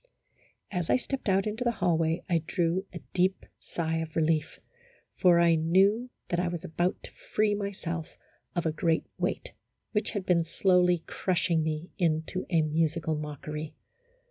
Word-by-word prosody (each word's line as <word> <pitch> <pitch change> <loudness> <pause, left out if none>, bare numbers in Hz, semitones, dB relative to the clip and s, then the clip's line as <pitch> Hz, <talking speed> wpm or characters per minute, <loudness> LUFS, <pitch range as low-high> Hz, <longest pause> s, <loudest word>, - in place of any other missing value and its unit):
29 180 - -1
As 170 - -3
I - - +5
stepped 260 -3 -3
out 195 0 +3
into 215 +3 -2
the 240 -1 +2
hallway, 165 0 +1
I 170 -2 +2
drew 180 +2 0
a - - -8
deep 185 +1 +1
sigh 165 -1 -2
of 160 -1 -4
relief, 155 -1 +1 0.6
for 175 -3 +5
I 170 -1 +5
knew 190 +9 +3 0.2
that 175 - 0
I 180 - +1
was 175 -2 -4
about 175 +3 -1
to - - -9
free 210 -1 0
myself 190 -5 -4 0.4
of 175 - 0
a 160 - +2
great 165 +1 +1
weight, - - -2 0.4
which 210 - 0
had 205 -4 -3
been 170 -3 +3
slowly 180 0 +3
crushing 170 -2 +1
me 155 +2 -3
into 165 +1 0
a 165 -3 +3
musical 160 +1 0
mockery. 150 +1 -5
170 Hz, 165 wpm, -29 LUFS, 160-185 Hz, 0.6 s, I